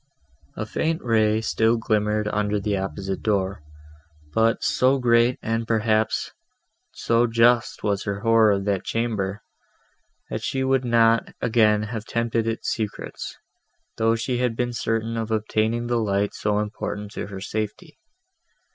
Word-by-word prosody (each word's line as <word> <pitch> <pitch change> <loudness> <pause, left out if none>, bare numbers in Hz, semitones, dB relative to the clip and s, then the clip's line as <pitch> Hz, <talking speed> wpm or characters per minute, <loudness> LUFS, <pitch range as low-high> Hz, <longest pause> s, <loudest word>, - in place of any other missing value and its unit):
A 110 - -3
faint 160 +9 -1
ray 110 -2 +2
still 115 +1 +2
glimmered 105 -1 0
under 105 0 0
the 100 0 -1
opposite 95 0 -4
door, 100 -4 0 0.7
but 115 0 +2
so 130 +2 +3
great, 120 -1 +3
and, 115 0 -1
perhaps, 110 -1 +1 0.6
so 115 +1 +1
just 115 +1 +2
was 100 -1 0
her 100 -1 -3
horror 115 -1 +5
of 100 0 -2
that 100 -3 0
chamber, 105 -4 -2 0.9
that - - -3
she 135 0 -1
would 130 0 +2
not 115 -1 +3
again 110 -2 +3
have 110 0 -5
tempted 115 -1 -1
its 115 0 -2
secrets, 110 -3 -5 0.6
though 115 +1 +3
she 120 +2 -2
had 125 -2 0
been 120 +1 -1
certain 115 0 -1
of 110 -1 -3
obtaining 110 +2 0
the 120 0 0
light 100 -2 0
so 105 -1 -1
important 105 -1 -4
to - - -5
her 100 -2 -7
safety. 110 - -5
110 Hz, 145 wpm, -24 LUFS, 105-115 Hz, 0.9 s, horror